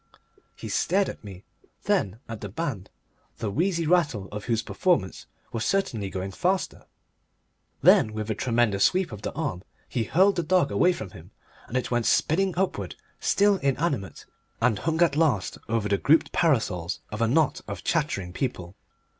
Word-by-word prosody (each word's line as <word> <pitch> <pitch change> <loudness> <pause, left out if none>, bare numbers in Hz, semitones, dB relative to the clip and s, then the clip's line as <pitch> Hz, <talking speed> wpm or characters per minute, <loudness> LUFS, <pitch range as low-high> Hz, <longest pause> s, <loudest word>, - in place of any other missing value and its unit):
He - - -8
stared 195 +3 +1
at - - -9
me. 95 -3 -10 0.4
Then 100 +2 0
at 115 -2 -7
the 105 - -5
band, 105 - -4 0.5
the 105 - -3
wheezy 170 - 0
rattle 150 - +1
of 105 0 -6
whose 115 -2 0
performance 140 - 0 0.2
was 115 -1 -2
certainly 120 - 0
going 95 0 -4
faster. 185 - -1 1.0
Then 110 - +6
with 110 0 -3
a - - +2
tremendous 115 -3 +1
sweep 185 -4 +2
of 105 -2 -8
the - - -3
arm 135 - -3 0.3
he 120 -3 -2
hurled 190 - +3
the - - +2
dog 180 +2 +2
away 180 - +4
from 110 - -6
him 90 0 -13 0.4
and 125 - -2
it 130 - -2
went 120 -2 +1
spinning 190 +3 +2
upward, 190 0 -1 0.2
still 200 0 +3
inanimate, 140 - -2 0.3
and 115 -3 +2
hung 160 0 -1
at 165 -4 +2
last 150 -11 +1
over 110 -2 0
the 100 -1 +1
grouped 160 +3 +3
parasols 105 - 0
of 105 +1 -4
a 115 - +3
knot 150 +4 +2
of 100 -4 -6
chattering 125 - -1
people. 95 -6 -4
120 Hz, 170 wpm, -26 LUFS, 100-170 Hz, 1.0 s, Then